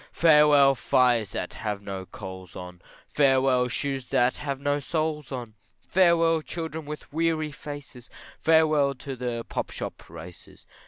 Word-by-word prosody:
Farewell 150 -4 +6
fires 120 -4 +2
that - - -4
have 105 -2 -4
no 95 -2 -6
coals 95 -3 -9
on, 90 -1 -9 0.3
Farewell 130 -3 +3
shoes 135 +1 -3
that 125 +1 +2
have 140 -2 -4
no 145 +1 0
soles 155 -1 -3
on, 120 -4 -6 0.3
Farewell 165 -3 +3
children 160 -1 -6
with 150 0 -7
wry 160 -1 0
faces, 145 -4 -9 0.3
Farewell 155 -3 +3
to 135 +1 -7
the 120 -2 -4
pop - - -3
shop - - -7
races. 90 -1 -12
140 Hz, 140 wpm, -26 LUFS, 120-155 Hz, 0.3 s, Farewell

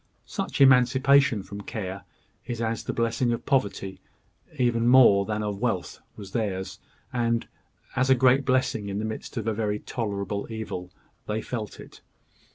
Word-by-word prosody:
Such - - -4
emancipation 130 -3 +5
from 100 +2 -8
care 100 -3 -6 0.4
as 120 -1 -3
is 115 0 -2
the - - -1
blessing 115 +1 0
of 115 - -5
poverty, 100 -8 -1 0.6
even 120 -2 +2
more 120 -6 +7
than 105 0 -2
of 105 -2 -3
wealth, 110 -7 -2 0.2
was 100 -2 -10
theirs; 95 -4 -3 0.3
and, 115 -1 0 0.5
as 130 +1 +2
a 130 - +7
great 130 +2 +4
blessing 130 -5 0
in 100 - -3
the 110 - -2
midst 110 +3 -6
of 110 - -2
very 105 -1 -1
tolerable 100 -3 -3
evil, 90 -5 -5 0.4
they 105 +1 -1
felt 110 -4 -5
it. - - -13
110 Hz, 155 wpm, -26 LUFS, 100-125 Hz, 0.6 s, more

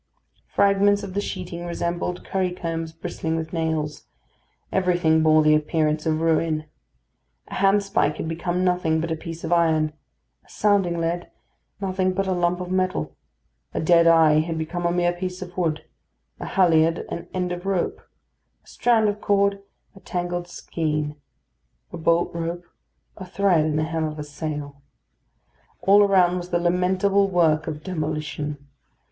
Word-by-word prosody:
Fragments 200 0 +3
of 195 -2 -6
the 205 - 0
sheeting 180 -3 -5
resembled 175 +1 -3
currycombs 170 -3 -2
bristling 160 0 -4
with 160 0 -4
nails; 160 -2 -2 0.6
everything 175 -4 +2
bore 155 0 +5
the 155 0 +5
appearance 155 0 +1
of 155 0 +1
ruin; 160 -1 +1 0.8
a - - -9
handspike 195 -5 +2
had - - -4
become 175 +2 -2
nothing 180 -3 +1
but 165 +1 -3
a - - +1
piece 165 +1 -8
of 165 +1 0
iron; 160 -2 +2 0.5
a - - -27
sounding 195 -5 +1
lead, 170 +1 -2 0.5
nothing 185 -1 0
but 195 +1 -1
a 190 - -1
lump 175 0 0
of 180 0 -5
metal; 185 0 -1 0.6
a - - 0
dead 170 +1 +4
eye 160 -2 +6
had 165 +1 -2
become 175 +2 -2
a - - +1
mere 175 0 +1
piece 180 +1 -5
of 180 -1 -12
wood; 160 -4 -1 0.5
a - - -5
halliard, 165 -3 +3
an 170 - -5
end 180 -1 -2
of 175 +2 -5
rope; 190 -3 -1 0.6
a - - -29
strand 230 -3 +2
of 205 0 -2
cord, 200 0 +2 0.3
a - - -13
tangled 175 -1 -3
skein; 150 -3 -3 0.8
a - - -4
bolt 170 +1 +1
rope, 170 +1 -4 0.5
a 190 - -7
thread 185 -3 +2
in 155 -1 0
the 155 - +1
hem 160 0 -1
of 155 0 -5
a 150 - -4
sail. 145 -1 -6 1.0
All 200 +1 +6
around 185 -3 +4
was 175 0 -6
the 175 - +1
lamentable 185 +3 +2
work 160 -4 +2
of 155 -1 -5
demolition. 150 -4 -4
170 Hz, 155 wpm, -23 LUFS, 160-185 Hz, 1.0 s, eye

